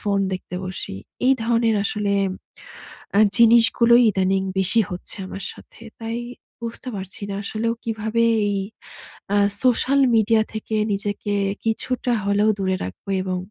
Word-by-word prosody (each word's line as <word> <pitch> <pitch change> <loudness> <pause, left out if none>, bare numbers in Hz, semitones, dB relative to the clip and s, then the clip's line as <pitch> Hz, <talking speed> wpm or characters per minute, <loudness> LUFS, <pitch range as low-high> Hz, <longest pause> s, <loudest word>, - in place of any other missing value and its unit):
Phone 200 -1 0
দেখতে 185 -1 -6
বসি। 185 - -6 0.3
এই 265 - +6
ধরনের 230 -1 +2
আসলে 205 -1 -1 1.1
আ - - +6 0.2
জিনিসগুলোই 235 +1 +6
ইদানিং 190 0 +1 0.2
বেশি 190 +5 +3
হচ্ছে 180 0 -6
আমার 195 - -7
সাথে। - - -17 0.2
তাই 225 +1 -3 0.4
বুঝতে 235 +2 -5
পারছি 190 +1 -7
না, 200 - -3
আসলেও 225 +3 -1
কিভাবে 220 0 -1 0.3
এই 200 - -1 0.8
আ - - +3 0.3
সোশ্যাল 260 +2 +3 0.2
মিডিয়া 220 0 +4
থেকে 220 0 -4 0.2
নিজেকে 205 +1 -2 0.3
কিছুটা 245 +2 -1
হলেও 205 +2 +2
দূরে 190 -1 0
রাখব 95 +1 -8 0.2
এবং 185 -1 -2
215 Hz, 135 wpm, -22 LUFS, 195-230 Hz, 1.1 s, এই